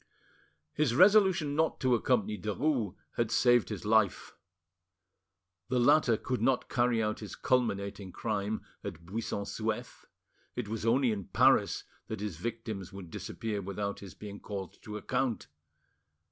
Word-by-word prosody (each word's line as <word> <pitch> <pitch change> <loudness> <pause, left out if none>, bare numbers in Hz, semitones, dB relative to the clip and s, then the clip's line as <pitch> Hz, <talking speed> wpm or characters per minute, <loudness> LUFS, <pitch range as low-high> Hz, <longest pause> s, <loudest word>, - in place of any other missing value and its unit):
His 140 -6 +1
resolution 190 - +5
not 160 +1 +1
to 130 -2 +3
accompany 110 -3 +2
Derues 110 - -1 0.2
had 115 -2 +1
saved 120 0 +4
his - - -5
life. 105 -5 +2 1.4
The 130 - +1
latter 125 -2 +5
could 125 +2 -3
not 130 -2 +2
carry 120 -2 +2
out 105 0 -1
his 105 - -7
culminating 100 -6 0
crime 105 0 -2 0.2
at 85 - -7
Buisson 105 +2 -3
Souef; 110 +1 -4 0.5
it 125 -4 -3
was 110 +1 -3
only 125 +1 +4
in 100 -4 -3
Paris - - +3 0.2
that 110 - -4
his 100 -6 -4
victims 110 -2 -5
would 95 -4 -9
disappear 110 -3 -4
without 100 +1 -3
his 100 -2 -10
being 105 -1 -8
called 100 -3 -7
to 105 -1 -6
account. 120 +2 -1
110 Hz, 140 wpm, -31 LUFS, 100-125 Hz, 1.4 s, resolution